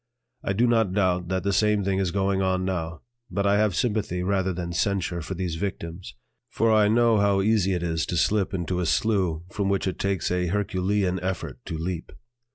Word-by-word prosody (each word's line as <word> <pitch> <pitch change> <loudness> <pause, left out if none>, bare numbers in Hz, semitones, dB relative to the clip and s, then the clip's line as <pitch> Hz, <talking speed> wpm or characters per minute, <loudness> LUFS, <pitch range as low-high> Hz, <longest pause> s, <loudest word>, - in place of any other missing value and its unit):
I 95 - 0
do 115 +5 +3
not 115 -5 +2
doubt 90 -3 +1
that 95 +1 -1
the 100 0 0
same 105 0 +2
thing 95 0 0
is 95 -2 +1
going 95 +1 0
on 95 -1 +1
now, 85 -3 -3 0.3
but 100 +1 -1
I 100 +1 +3
have 105 -4 +2
sympathy 105 -3 -1
rather 95 0 +1
than 85 -1 -4
censure 90 -2 -1
for 80 +5 -5
these 85 -2 -3
victims, 85 -6 -5 0.3
for 115 -1 +2
I 105 -1 +5
know 115 0 +4
how 100 -1 +3
easy 100 -3 +2
it 90 -1 -2
is 80 -2 -1
to 90 - -2
slip 100 +2 +2
into 90 -1 -2
a 90 - 0
slough 95 -8 +1
from 100 -1 -1
which 100 -1 0
it 95 - -3
takes 95 -3 -1
a 90 0 0
herculean 95 0 0
effort 90 0 -4
to 80 - -4
leap. 85 +1 -4
95 Hz, 205 wpm, -25 LUFS, 90-100 Hz, 0.3 s, I